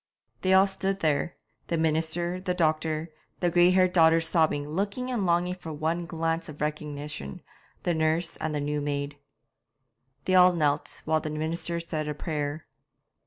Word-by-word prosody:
They 190 0 +4
all 190 +1 +7
stood 195 0 -2
there 155 +1 0 0.3
the 170 - 0
minister, 160 +3 0
the 180 -1 -1
doctor, 155 -1 0 0.3
the 175 -1 +1
grey 175 +1 +5
haired 185 0 +3
daughters 165 -1 +5
sobbing, 155 -3 +2
looking 200 +10 -2
and 215 -7 0
longing 175 +1 +2
for 175 -3 -8
one 160 +3 -2
glance 165 0 -2
of 150 - -10
recognition, 150 - -4 0.4
the 175 - +1
nurse, 160 +1 +1
and 155 -1 -3
the 145 - -1
new 150 +1 -1
maid. 145 0 -3 1.1
They 185 - +1
all 180 0 +7
knelt, 150 -3 -1
while 155 0 +2
the 155 - -4
minister 165 +2 -2
said 155 -2 -3
a 150 - -3
prayer. 150 -1 -3
160 Hz, 165 wpm, -27 LUFS, 150-175 Hz, 1.1 s, all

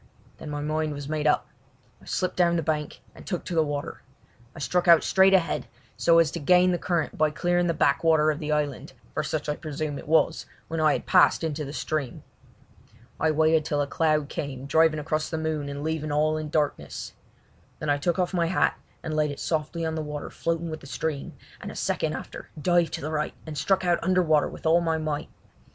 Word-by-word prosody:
Then 155 - -7
my 145 0 -3
mind 155 0 -1
was 145 -1 -6
made 155 0 -1
up. 150 - +2 0.5
I - - -17
slipped 185 - -2
down 170 -1 +3
the 165 - 0
bank 150 -1 -2
and - - -13
took 180 -4 -4
to - - -5
the 165 - +4
water. 145 -2 -3 0.5
I - - -12
struck 175 +6 0
out 170 -1 +7
straight 190 0 +5
ahead 180 -3 0 0.3
so 170 -1 +4
as 165 -3 +4
to 170 - -4
gain 180 +4 +4
the 175 - 0
current 170 -4 -1
by 155 0 +4
clearing 175 +3 +1
the 170 - 0
backwater 155 +1 +3
of 150 - -5
the 155 -2 -3
island, 145 -3 -2 0.2
for - - 0
such 155 0 -3
I 150 - 0
presume 150 -2 -4
it - - -11
was, 160 +1 +2 0.2
when 165 0 -2
I 155 -1 +4
had - - -3
passed - - +4
into 155 -2 -2
the 140 - -6
stream. 150 -3 -3 1.0
I 160 - +2
waited 155 +1 +3
till 150 -2 -1
a 145 - +2
cloud 155 0 +1
came 140 -4 -5
driving 160 +1 +3
across 155 +1 -2
the 160 - -3
moon 155 -2 -2
and 140 0 -5
leaving 155 -1 -2
all 155 +1 +2
in 155 -1 -4
darkness. 150 -1 -2 0.6
Then 155 -3 -1
I 145 - +1
took 170 +4 0
off 180 0 0
my 170 -2 +1
hat 180 - +1 0.2
and 155 - -3
laid 150 -1 +2
it 145 - -6
softly 160 +1 -2
on 160 - -1
the 160 - -2
water 150 -1 -6
floating 165 0 -2
with 155 - -5
the 135 - -13
stream, 150 0 -3 0.3
and - - -6
a - - -11
second - - -1
after - - -8
dived 175 +2 +2
to - - -3
the 155 - -4
right 150 -1 -2
and 155 -1 -6
struck 185 +6 +1
out 175 -1 +2
under 185 +1 +3
water 155 -3 +3
with - - -11
all 165 +2 +4
my 165 -1 0
might. 155 -2 -3
155 Hz, 225 wpm, -26 LUFS, 150-165 Hz, 1.0 s, out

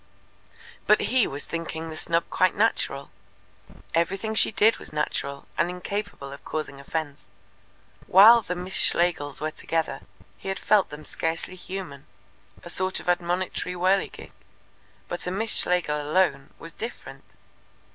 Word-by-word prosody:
But - - +5
he 255 -4 +4
was 140 +1 -6
thinking 165 -1 -4
the - - -6
snub 170 +1 0
quite 185 - +2
natural. 170 -10 0 0.8
Everything 195 +6 0
she 220 - +3
did 215 +2 +4
was - - -6
natural, 140 -2 -3
and 175 - +3
incapable 180 -5 -5
of 140 - -12
causing 150 -3 -4
offence. 145 -2 -5 0.8
While 220 +5 +9
the 180 -4 -4
Miss 180 +2 -5
Schlegels 170 -5 +2
were 155 0 -1
together 160 -4 -2 0.4
he - - -6
had 195 - -2
felt 210 -2 +3
them 150 +1 -9
scarcely 165 +2 -2
human 180 -7 -7 0.6
a 175 - -8
sort 185 +1 0
of - - -12
admonitory 180 +1 -1
whirligig. 185 +2 0 0.8
But 175 - -5
a - - -1
Miss 220 +4 +1
Schlegel 165 -4 +2
alone 145 -3 +1
was 165 -1 -10
different. 230 +6 -9
175 Hz, 140 wpm, -26 LUFS, 155-190 Hz, 0.8 s, While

